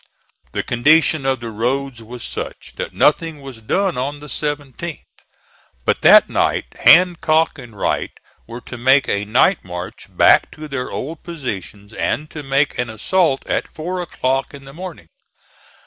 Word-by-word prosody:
The - - -1
condition 145 +3 +3
of 130 -3 0
the 115 -1 -5
roads 125 +3 -2
was 120 +2 -9
such - - -7
that - - -4
nothing 160 0 +2
was 135 -5 -10
done 185 - 0
on 140 +3 -3
the 150 - -11
17th. 145 +2 -4 0.8
But - - +1
that - - +8
night - - 0
Hancock 165 -3 +4
and 120 -5 -12
Wright - - -1 0.4
were 120 +2 -8
to 120 +1 -9
make 130 +3 +4
a 100 +1 -1
night 125 - +3
march 90 0 -7
back - - +4
to 155 0 -9
their 135 -3 -4
old 155 +4 -5
positions, 105 - -7
and 150 +5 -2
to 150 - -6
make 140 0 0
an 125 -1 -1
assault 135 - +1
at - - -2
four 180 +3 -4
o'clock 135 -5 -2
in 140 -1 -12
the 135 - -12
morning. 165 - -9
135 Hz, 160 wpm, -19 LUFS, 120-155 Hz, 0.8 s, that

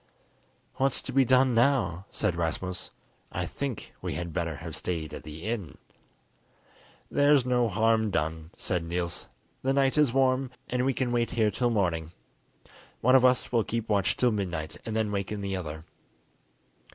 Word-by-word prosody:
"What's 135 -1 +2
to - - -5
be 135 0 +5
done 130 0 +4
now?" 115 - +2
said 85 - -1
Rasmus. 85 +1 -2 0.4
"I - - -2
think 140 -5 -5
we - - -3
had 85 -2 -4
better 85 -3 -1
have 80 +1 -7
stayed 80 -2 -3
at - - -6
the 75 +2 -9
inn." 105 -6 -4 1.3
"There's 145 -2 +4
no 125 -2 +2
harm 110 +1 +2
done," 80 -3 -2
said 90 -2 -1
Niels. 85 0 -3 0.3
"The 135 +1 +1
night 135 +1 +3
is 145 -5 +4
warm, 130 0 +2 0.2
and 125 +1 +1
we 135 - +2
can 125 -2 0
wait 120 -1 +1
here 110 -3 +2
till 120 +5 +1
morning. 85 -7 0 0.9
One 130 +3 +5
of 130 - +6
us 125 0 +3
will 115 -2 +3
keep 115 0 -3
watch 100 -3 +2
till 125 -1 +3
midnight, 85 -7 -3
and 110 - -3
then 110 -2 0
waken 100 +1 -2
the 100 -1 -2
other." 80 -3 -6
105 Hz, 165 wpm, -28 LUFS, 85-125 Hz, 1.3 s, of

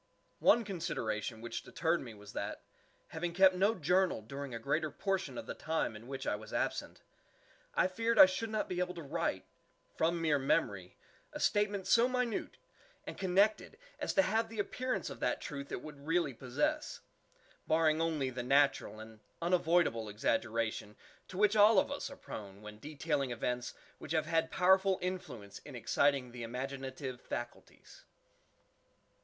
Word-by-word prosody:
One 235 - +5
consideration 110 - -3
which 120 - -4
deterred 170 +1 0
me 115 -4 -9
was 105 -1 -12
that, - - -4 0.5
having 170 +1 -4
kept 190 0 +7
no 200 +5 +2
journal 180 - +2
during 140 +4 -6
a 115 - -4
greater 150 +6 0
portion 190 +5 -2
of 290 - -5
the - - -5
time 160 -8 -2
in 110 +3 -11
which 135 0 -5
I - - +1
was 105 +1 -10
absent, - - -2 0.7
I - - +4
feared 225 +5 0
I - - +12
should 185 +5 -2
not 215 0 -1
be 180 - -3
able 180 0 -1
to 170 - -7
write, 140 - -2 0.5
from 170 +1 +1
mere 155 -3 +2
memory, 100 - 0 0.4
a - - -5
statement 205 -2 +1
so 235 +1 +5
minute 250 -3 -2 0.5
and - - -6
connected 200 +3 +2 0.2
as - - -1
to 290 - +6
have 225 -1 +1
the 225 - -9
_appearance_of 250 +5 -2
that - - 0
truth 140 -1 -6
it - - -4
would 150 -1 -10
really 165 -4 +1
possess, 300 - -2 0.7
barring 160 0 +3
only 155 -5 0
the 125 0 -4
natural 135 -3 +2
and 110 0 -11 0.2
unavoidable 170 -9 +2
exaggeration 110 0 -1 0.3
to 185 - -9
which 210 +1 +4
all 210 0 +7
of 235 - +3
us 285 - -3
are 275 - -10
prone 100 -1 -9
when 105 0 -9
detailing 145 0 -2
events 125 +1 -2 0.2
which - - -5
have 160 -1 +2
had 165 0 +1
powerful 190 +1 +4
influence 130 - -5
in 145 - -11
exciting 135 +1 +1
the 120 0 -8
imaginative 130 +1 -5
faculties. 120 0 -8
155 Hz, 160 wpm, -33 LUFS, 125-190 Hz, 0.7 s, I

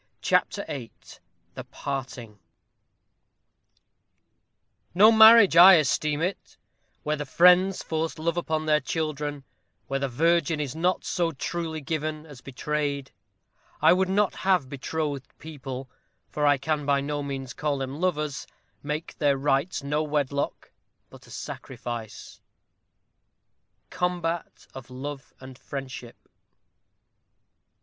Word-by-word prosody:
CHAPTER - - +1
VIII 125 -5 -6 0.6
THE - - -7
PARTING 125 -6 -6 2.6
No 210 +5 +7
marriage 220 -4 +8
I 180 +3 +10
esteem 150 0 +1
it, 185 +3 -4 0.5
where 150 0 0
the 145 - -4
friends 180 +4 +4
Force 160 0 -3
love 165 +1 -1
upon 160 -2 -2
their 150 -1 +3
children; 150 -1 -3 0.4
where 135 0 -2
the 135 0 -2
virgin 165 +4 +1
Is 145 -2 -4
not 180 +3 0
so 170 -2 0
truly 160 +3 -4
given 155 +1 -4
as 145 -5 -13
betrayed. 140 +1 -3 0.7
I 160 +2 +6
would 185 +1 +1
not 205 +1 +2
have 185 -8 +1
betrothed 145 0 -4
people 135 -4 -8 0.4
for 150 -1 -1
I 145 -1 +4
can 150 +2 -2
by 140 -1 +2
no 145 +1 -3
means 135 -2 -5
call 150 -2 -2
them 135 +3 -5
lovers 150 -7 -2 0.3
make 150 +2 -5
Their 145 -2 +2
rites 140 +3 0
no 150 +2 -1
wedlock, 145 -2 -2 0.4
but - - -15
a - - -17
sacrifice. 115 -3 -8 1.5
_Combat 175 -2 -3
of 130 -2 -10
Love 135 +2 -7
and 130 -1 -12
Friendship. 135 -4 -8
150 Hz, 120 wpm, -26 LUFS, 135-165 Hz, 2.6 s, I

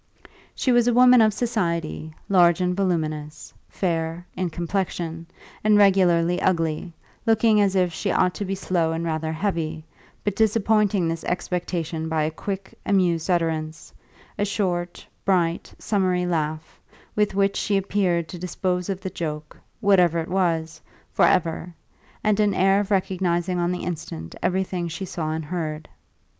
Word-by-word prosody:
She 255 - +1
was 240 -1 +4
a 240 - +3
woman 250 -1 +7
of 215 -1 +5
society, 170 -9 -2 0.2
large 175 -3 +5
and 180 0 0
voluminous, 155 -5 -2 0.2
fair 165 -1 -2
(in 185 -1 -1
complexion) 170 -1 -3 0.4
and 210 -1 +5
regularly 180 -4 +4
ugly, 165 -1 0 0.3
looking 220 -1 +4
as 200 -1 +2
if 180 -2 +2
she 200 - -2
ought 180 -1 +2
to - - -4
be 195 +1 -2
slow 170 -4 0
and 165 +1 -3
rather 160 -1 -2
heavy, 160 -3 -2 0.4
but 205 -2 -1
disappointing 210 -4 +2
this 165 0 -3
expectation 175 -2 -2
by 160 -1 +1
a 155 - -1
quick, 195 +4 -5
amused 180 -4 +1
utterance, 160 -2 -1 0.5
a - - +2
short, 180 -4 -2 0.2
bright, 175 -3 +1
summary 185 -4 0
laugh, 155 -2 -3 0.3
with 210 -2 +1
which 200 0 +2
she 200 - +1
appeared 185 -4 0
to 180 - -7
dispose 180 0 -2
of 195 -1 -3
the 190 -1 -5
joke 150 -2 -5 0.3
(whatever 180 -5 +4
it 165 0 -3
was) 170 -3 0 0.3
for - - +4
ever, 170 0 0 0.5
and 215 -1 +2
an 205 -2 +2
air 195 +1 +4
of 205 -1 -2
recognising 180 -2 0
on 175 0 +1
the 180 - -3
instant 80 - -5
everything 185 -2 -1
she 165 +3 -5
saw 165 -3 -4
and 160 0 -3
heard. 155 -2 -4
180 Hz, 150 wpm, -24 LUFS, 165-195 Hz, 0.5 s, woman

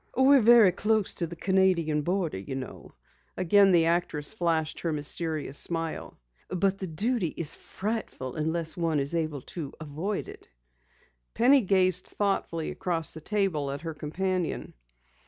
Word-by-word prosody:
"We're 265 +1 +6
very 230 -4 +7
close 210 +2 0
to 170 - -1
the 170 - -8
Canadian 180 -4 +2
border, 175 - -1
you 100 +7 -6
know." 130 -1 -8 0.4
Again 195 +2 +5
the 170 -2 +4
actress 165 -3 0
flashed 165 -6 -1
her 165 - -2
mysterious 150 -1 -1
smile. 165 -1 -2 0.3
"But 195 +2 0
the 190 - -4
duty 205 +5 0
is 155 -3 +1
frightful 200 - -5
unless 160 +1 -1
one 165 -3 0
is 140 +3 -2
able 155 -4 -2
to 160 -6 -6
avoid 160 +7 -4
it." - - -12 0.9
Penny 265 +4 +5
gazed 185 -3 +2
thoughtfully 195 -5 -2
across 165 -4 -2
the 160 - -9
table 185 -7 -1
at 140 +1 -5
her 165 -1 -5
companion. 180 +4 -3
170 Hz, 145 wpm, -27 LUFS, 155-195 Hz, 0.9 s, very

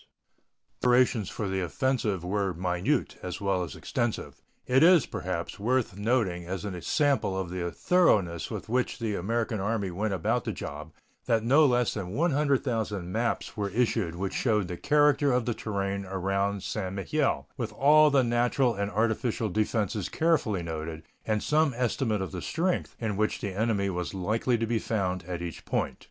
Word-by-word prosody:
The - - 0
preparations 120 -4 +3
for 105 - -3
the 95 0 -1
offensive 110 - -1
were 95 0 -1
minute 90 +1 -1
as 90 - -5
well 100 -2 0
as 80 -5 -7
extensive. 120 -2 -3 0.2
It 130 +1 +3
is, 170 -4 +7
perhaps, - - -4
worth 120 -1 0
noting 100 -5 0
as 95 +2 -4
a 90 -4 -5
sample 140 - +1
of 90 -2 -4
the 90 -1 -2
thoroughness 100 - +2
with - - -6
which 125 +2 0
the 115 -4 -2
American 110 +3 -1
Army 100 -1 -1
went 100 +3 -1
about 110 +7 0
the - - -3
job 75 +2 -7 0.4
that 115 -1 +2
no 145 +6 +5
less 125 -2 +2
than 95 -3 -5
100,000 130 - 0
maps 115 +3 -1
were 105 -2 -2
issued 110 -5 0
which 95 +2 -3
showed 105 -6 +1
the 90 - -3
character 145 +4 +3
of 125 -2 +1
the 120 - 0
terrain 100 -2 -3
around 95 +1 -1
St. 95 -3 -3
Mihiel, 135 +9 0
with 120 -5 -4
all 150 +2 +6
the 135 -2 +4
natural 120 +1 +2
and 100 -1 -2
artificial 110 +1 0
defenses 105 0 -1
carefully 140 - +1
noted, 80 0 -5 0.2
and 110 -1 0
some 150 -3 +2
estimate 115 -4 0
of 95 - -6
the 90 -2 -5
strength 175 - -1
in 105 -4 -2
which 110 +1 0
the 100 -2 -4
enemy 105 -2 +1
was 90 0 -3
likely 110 +6 0
to 115 - -1
be 115 0 0
found 95 -6 -1
at 85 -1 -4
each 85 -2 -6
point. - - -2
105 Hz, 175 wpm, -28 LUFS, 95-125 Hz, 0.4 s, is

